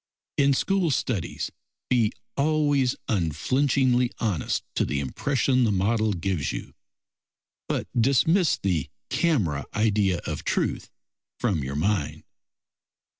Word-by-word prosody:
In 140 Hz, -1 st, +3 dB
school 195 Hz, +2 st, +1 dB
studies 125 Hz, -, -2 dB, 0.4 s
be 115 Hz, -4 st, +2 dB, 0.2 s
always 145 Hz, -3 st, +2 dB
unflinchingly 125 Hz, -, +2 dB
honest 100 Hz, -, -1 dB
to -, -, +1 dB
the 70 Hz, -, -1 dB
impression 130 Hz, -, +1 dB
the 110 Hz, -, +2 dB
model 105 Hz, +2 st, +1 dB
gives 85 Hz, -6 st, -1 dB
you, -, -, -6 dB, 1.0 s
but -, -, -1 dB
dismiss 140 Hz, -, +3 dB
the 90 Hz, -7 st, -1 dB, 0.2 s
camera 100 Hz, -, +1 dB
idea 105 Hz, -4 st, +2 dB
of -, -, -4 dB
truth -, -, -1 dB, 0.5 s
from 100 Hz, -, 0 dB
your 70 Hz, +1 st, -4 dB
mind. 90 Hz, 0 st, -1 dB
115 Hz, 110 wpm, -25 LUFS, 90-140 Hz, 1.0 s, In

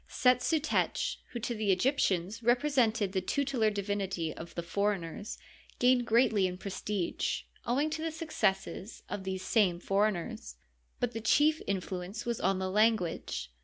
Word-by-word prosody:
SeUSutech, 270 Hz, +5 st, +2 dB
who 240 Hz, -, -5 dB
to 240 Hz, -, -2 dB
the 215 Hz, -3 st, +1 dB
Egyptians 200 Hz, -2 st, +1 dB
represented 240 Hz, -4 st, +2 dB
the 190 Hz, -1 st, 0 dB
tutelar 255 Hz, -1 st, +1 dB
divinity 195 Hz, -5 st, -2 dB
of 170 Hz, +1 st, -10 dB
the 170 Hz, -, -3 dB
foreigners, 200 Hz, +1 st, -2 dB, 0.4 s
gained 245 Hz, -1 st, +3 dB
greatly 220 Hz, -4 st, +4 dB
in 180 Hz, 0 st, -5 dB
prestige, 195 Hz, -1 st, -2 dB, 0.2 s
owing 280 Hz, +6 st, +1 dB
to 315 Hz, 0 st, -3 dB
the 325 Hz, 0 st, -2 dB
suc 320 Hz, 0 st, -7 dB
cesses 195 Hz, +1 st, -1 dB
of 190 Hz, -, -4 dB
these 190 Hz, 0 st, -3 dB
same 190 Hz, -7 st, +2 dB
foreigners. 195 Hz, -, -1 dB, 0.4 s
But 245 Hz, -, 0 dB
the 225 Hz, -, -5 dB
chief 300 Hz, +8 st, +3 dB
influence 190 Hz, +2 st, -3 dB
was 235 Hz, -1 st, -2 dB
on 195 Hz, 0 st, +2 dB
the 190 Hz, 0 st, -2 dB
language. 185 Hz, -, +1 dB
210 Hz, 145 wpm, -31 LUFS, 190-245 Hz, 0.4 s, greatly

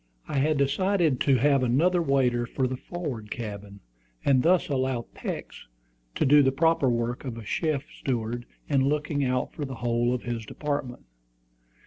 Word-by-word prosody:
I 140 Hz, -, -1 dB
had 150 Hz, +2 st, +2 dB
decided 160 Hz, +1 st, +2 dB
to 135 Hz, -, +3 dB
have 140 Hz, +2 st, +3 dB
another 160 Hz, +9 st, +3 dB
waiter 125 Hz, -5 st, +1 dB
for 130 Hz, +1 st, -1 dB
the 130 Hz, -, -3 dB
forward 130 Hz, -8 st, -6 dB
cabin, 100 Hz, -3 st, -7 dB, 0.4 s
and 135 Hz, -2 st, +4 dB
thus 180 Hz, +4 st, +3 dB
allow 130 Hz, -4 st, -1 dB
Peeks -, -, -6 dB, 0.5 s
to -, -, +1 dB
do 145 Hz, +2 st, +7 dB
the 135 Hz, -1 st, +3 dB
proper 160 Hz, -1 st, +2 dB
work 120 Hz, 0 st, -1 dB
of 125 Hz, -4 st, -5 dB
a 115 Hz, -, -7 dB
chief 145 Hz, -, -1 dB
steward 120 Hz, -1 st, -2 dB, 0.2 s
in 135 Hz, -2 st, +2 dB
looking 145 Hz, -1 st, 0 dB
out 125 Hz, -1 st, -1 dB
for 150 Hz, -, -5 dB
the 135 Hz, -2 st, -5 dB
whole 120 Hz, 0 st, 0 dB
of 125 Hz, -1 st, -2 dB
his 120 Hz, -2 st, -3 dB
department. 140 Hz, -, -4 dB
130 Hz, 165 wpm, -27 LUFS, 120-145 Hz, 0.5 s, do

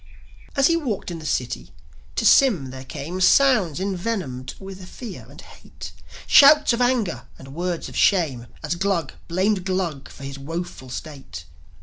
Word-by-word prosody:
As 275 Hz, -1 st, +3 dB
he 335 Hz, -, +4 dB
walked 245 Hz, -, -3 dB
in 170 Hz, -, -6 dB
the 155 Hz, -, -7 dB
city, 120 Hz, -, -2 dB, 0.5 s
to -, -, -1 dB
Sym 185 Hz, -, +5 dB
there 130 Hz, 0 st, -9 dB
came 155 Hz, +7 st, -6 dB
Sounds 210 Hz, -, +4 dB
envenomed 180 Hz, -, -3 dB
with 190 Hz, -1 st, -9 dB
fear 235 Hz, -6 st, -9 dB
and -, -, -14 dB
hate, -, -, -11 dB, 0.3 s
Shouts 295 Hz, -1 st, +7 dB
of 235 Hz, -, -1 dB
anger 225 Hz, -, 0 dB
and 135 Hz, 0 st, -12 dB
words 175 Hz, +1 st, -3 dB
of -, -, -11 dB
shame, 145 Hz, -11 st, +2 dB, 0.2 s
As 150 Hz, +2 st, -1 dB
Glug 175 Hz, -4 st, -1 dB
blamed 185 Hz, +3 st, +1 dB
Glug 180 Hz, -7 st, -2 dB
for 140 Hz, -, -12 dB
his 140 Hz, 0 st, -7 dB
woeful 165 Hz, -2 st, -6 dB
state. 135 Hz, -, -8 dB
175 Hz, 155 wpm, -23 LUFS, 140-200 Hz, 0.5 s, Shouts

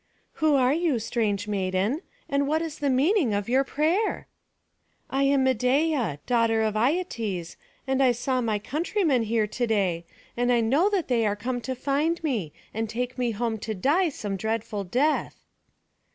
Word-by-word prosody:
"Who 310 Hz, -2 st, +4 dB
are 260 Hz, 0 st, +3 dB
you, 325 Hz, -4 st, +1 dB
strange 220 Hz, -2 st, -1 dB
maiden? 195 Hz, -, 0 dB, 0.3 s
and 280 Hz, 0 st, 0 dB
what 315 Hz, +3 st, +1 dB
is 320 Hz, -2 st, -6 dB
the 285 Hz, -, 0 dB
meaning 270 Hz, -, +2 dB
of 205 Hz, -1 st, -2 dB
your 260 Hz, +3 st, +3 dB
prayer?" 325 Hz, +10 st, 0 dB, 0.9 s
"I 270 Hz, -, 0 dB
am 275 Hz, -1 st, +3 dB
Medeia, 260 Hz, -, +1 dB
daughter 230 Hz, -2 st, +2 dB
of 215 Hz, -1 st, 0 dB
Aietes, 225 Hz, -, -1 dB, 0.3 s
and 265 Hz, 0 st, +1 dB
I 260 Hz, -2 st, +5 dB
saw 250 Hz, +2 st, -1 dB
my 220 Hz, -3 st, 0 dB
countrymen 305 Hz, -, 0 dB
here 225 Hz, 0 st, +1 dB
to 240 Hz, +3 st, -2 dB
day; 185 Hz, -6 st, 0 dB, 0.3 s
and 245 Hz, +1 st, +1 dB
I 240 Hz, -, +4 dB
know 275 Hz, -, +3 dB
that 395 Hz, -5 st, -1 dB
they 240 Hz, -3 st, +2 dB
are 205 Hz, -, 0 dB
come 245 Hz, +4 st, -3 dB
to 260 Hz, +3 st, -4 dB
find 295 Hz, +6 st, 0 dB
me, 225 Hz, -, -1 dB, 0.2 s
and 225 Hz, 0 st, -2 dB
take 250 Hz, +3 st, -3 dB
me 245 Hz, -1 st, +1 dB
home 225 Hz, 0 st, -2 dB
to 220 Hz, +1 st, -4 dB
die 315 Hz, -, +2 dB
some 205 Hz, -8 st, -4 dB
dreadful 220 Hz, -1 st, -2 dB
death." 270 Hz, -, 0 dB
245 Hz, 170 wpm, -26 LUFS, 220-285 Hz, 0.9 s, I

